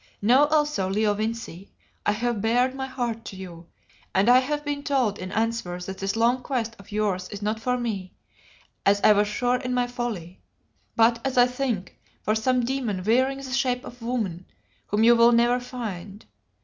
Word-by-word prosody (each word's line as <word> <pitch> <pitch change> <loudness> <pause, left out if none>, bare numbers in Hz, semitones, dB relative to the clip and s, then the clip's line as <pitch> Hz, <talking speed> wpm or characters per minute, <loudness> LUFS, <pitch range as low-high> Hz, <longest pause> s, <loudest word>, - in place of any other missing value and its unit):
Know 250 +8 +5
also, 295 -10 +1
Leo 210 +1 +2
Vincey, 215 -3 -4 0.4
I 205 - +4
have 235 -1 -1
bared 245 +4 +2
my 265 0 -4
heart 240 -3 -3
to - - -7
you, 175 -3 -10 0.5
and 195 +5 +4
I 250 +1 +8
have 295 +3 -3
been 290 0 -2
told 260 -8 0
in 185 0 -6
answer 225 -5 -1
that 190 +2 -7
this 195 +1 -2
long 240 +3 +2
quest 230 -5 -2
of 200 +1 -15
yours 200 -3 -1
is 205 0 -7
not 215 +1 -1
for 250 +2 0
me, 210 -6 -4 0.7
as 200 +1 +4
I - - +7
was 205 0 +2
sure 245 +4 0
in 250 -1 -3
my 245 0 +2
folly, 235 -8 -5 0.5
but, 230 0 +4
as 265 -1 -2
I 245 - +8
think, 250 -7 -3 0.2
for 215 - +1
some 245 +3 +1
demon 235 -8 -2
wearing 260 +6 +2
the 270 -2 -7
shape 250 -1 0
of 245 0 -11
woman, 215 -8 -3 0.4
whom 210 +2 +1
you 235 +1 +7
will 235 +1 +6
never 240 +1 +3
find. 210 -6 -7
230 Hz, 190 wpm, -25 LUFS, 205-250 Hz, 0.7 s, I